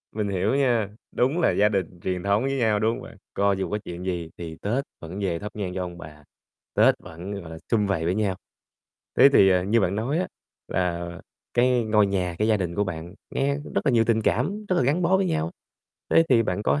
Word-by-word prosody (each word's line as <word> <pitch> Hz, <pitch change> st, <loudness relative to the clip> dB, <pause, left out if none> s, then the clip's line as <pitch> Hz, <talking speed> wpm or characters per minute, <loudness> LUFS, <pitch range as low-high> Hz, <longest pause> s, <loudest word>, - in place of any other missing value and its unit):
Mình 105 Hz, -2 st, -1 dB
hiểu 100 Hz, +5 st, +1 dB
nha, 120 Hz, -7 st, +2 dB, 0.2 s
đúng 135 Hz, +8 st, +1 dB
là -, -, +3 dB
gia 105 Hz, +1 st, +3 dB
đình 95 Hz, -4 st, -2 dB
truyền 90 Hz, 0 st, -3 dB
thống 100 Hz, +3 st, +2 dB
với 135 Hz, 0 st, -1 dB
nhau, 110 Hz, -4 st, +2 dB
đúng 110 Hz, +2 st, +2 dB
hông -, -, -5 dB
bạn? -, -, -11 dB, 0.2 s
Co 100 Hz, 0 st, +2 dB
dù 95 Hz, 0 st, -2 dB
có 105 Hz, -, -1 dB
chuyện 90 Hz, +1 st, -7 dB
gì 85 Hz, -3 st, -3 dB
thì 80 Hz, -2 st, -6 dB
Tết 120 Hz, +7 st, 0 dB, 0.2 s
vẫn 85 Hz, +4 st, -7 dB
về 90 Hz, -4 st, -1 dB
thắp 105 Hz, +1 st, -6 dB
nhang 95 Hz, -4 st, -3 dB
cho 95 Hz, -, -2 dB
ông 90 Hz, -1 st, -8 dB
bà, 75 Hz, -3 st, -11 dB, 0.5 s
Tết -, -, +5 dB
vẫn, 90 Hz, +5 st, -8 dB
gọi 85 Hz, -, -10 dB
là, 80 Hz, -, -7 dB
sum 105 Hz, -3 st, +3 dB
vầy 90 Hz, -5 st, 0 dB
với 90 Hz, +2 st, +1 dB
nhau. 100 Hz, -3 st, 0 dB, 0.8 s
Thế 135 Hz, -, +9 dB
thì, 95 Hz, -7 st, +6 dB
à, 90 Hz, -1 st, +3 dB
như 105 Hz, +5 st, +2 dB
bạn 95 Hz, -1 st, +1 dB
nói 130 Hz, +9 st, 0 dB
á 185 Hz, -, 0 dB, 0.4 s
là 85 Hz, -1 st, -1 dB, 0.4 s
cái 125 Hz, -1 st, +3 dB
ngôi 105 Hz, -1 st, +4 dB
nhà, 90 Hz, -3 st, -1 dB
cái 110 Hz, +1 st, +1 dB
gia 110 Hz, -, +4 dB
đình 90 Hz, -3 st, -3 dB
của 105 Hz, +2 st, +1 dB
bạn 85 Hz, 0 st, -6 dB, 0.2 s
nghe 140 Hz, +1 st, +1 dB
cũng -, -, -10 dB
rất -, -, 0 dB
là 135 Hz, -, +4 dB
nhiều 115 Hz, -1 st, +4 dB
tình 110 Hz, -1 st, +2 dB
cảm, 190 Hz, -, 0 dB
rất 185 Hz, -, +2 dB
là -, -, +3 dB
gắn 145 Hz, +8 st, +1 dB
bó 180 Hz, +2 st, +4 dB
với 190 Hz, 0 st, +1 dB
nhau, 80 Hz, -, -1 dB, 0.6 s
thế 165 Hz, -, +6 dB
thì 120 Hz, -3 st, +5 dB
bạn 100 Hz, -1 st, -2 dB
có 75 Hz, -8 st, +2 dB
100 Hz, 245 wpm, -25 LUFS, 90-120 Hz, 0.8 s, Thế